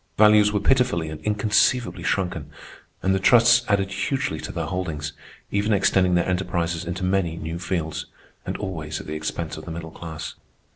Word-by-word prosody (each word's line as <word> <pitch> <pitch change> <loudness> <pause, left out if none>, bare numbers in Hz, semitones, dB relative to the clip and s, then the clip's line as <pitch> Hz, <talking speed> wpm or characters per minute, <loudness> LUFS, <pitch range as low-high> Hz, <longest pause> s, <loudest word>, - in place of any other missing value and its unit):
Values 105 0 +6
were 105 - +1
pitifully 125 -8 +2
and 80 -1 -7
inconceivably 105 0 +2
shrunken, 90 +2 -1 0.5
and 95 - +3
the 95 - +1
trusts 120 +3 +6
added 100 -1 +1
hugely 100 - -1
to - - -6
their - - -3
holdings, 80 -5 -3 0.4
even 105 +2 +1
extending 95 -2 +3
their 85 - +2
enterprises 90 -2 -1
into 85 +2 -4
many 90 -3 0
new 80 +1 -5
fields—and 80 -3 -5
always 80 -5 -4
at - - -9
the 75 - -5
expense 80 +1 -4
of 80 - -9
the 85 - -6
middle 80 0 -6
class. 80 -1 -7
90 Hz, 165 wpm, -24 LUFS, 80-105 Hz, 0.5 s, Values